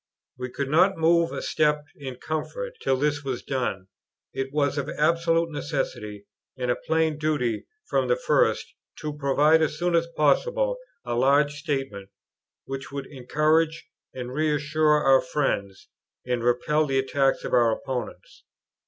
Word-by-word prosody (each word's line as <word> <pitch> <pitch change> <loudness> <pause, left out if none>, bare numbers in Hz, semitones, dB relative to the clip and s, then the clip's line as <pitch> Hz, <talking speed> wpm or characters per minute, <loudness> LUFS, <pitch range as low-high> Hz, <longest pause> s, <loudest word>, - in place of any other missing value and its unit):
We 125 0 -5
could 140 +2 -4
not 185 +5 +4
move 165 +1 +3
a - - -5
step 150 -1 +1
in 135 -3 -7
comfort, 485 - -4
till 135 - +1
this 145 +1 0
was 130 -3 -4
done. 125 -8 -2 0.5
It 135 0 -3
was 145 -1 +1
of 140 +1 -3
absolute 165 +1 +1
necessity 105 - -4 0.3
and 125 -1 0
a - - +1
plain 160 -1 0
duty 145 -8 -1 0.2
from - - +1
the 485 - +3
first, - - +1 0.3
to 150 -1 -3
provide 150 +3 +3
as 150 -1 0
soon 175 +2 0
as 170 0 +2
possible - - +2 0.3
a 120 - -2
large 140 +4 +3
statement, 135 -9 -4 0.6
which 135 0 -6
would 140 -1 -5
encourage 155 +4 0 0.2
and 125 -1 -6
reassure 150 0 +2
our 135 -1 +6
friends, 100 -9 -2 0.4
and 125 -2 -1
repel 150 +6 +2
the 135 -1 0
attacks 135 0 +1
of - - -5
our 120 -2 +5
opponents. 125 0 -5
145 Hz, 150 wpm, -25 LUFS, 130-155 Hz, 0.6 s, our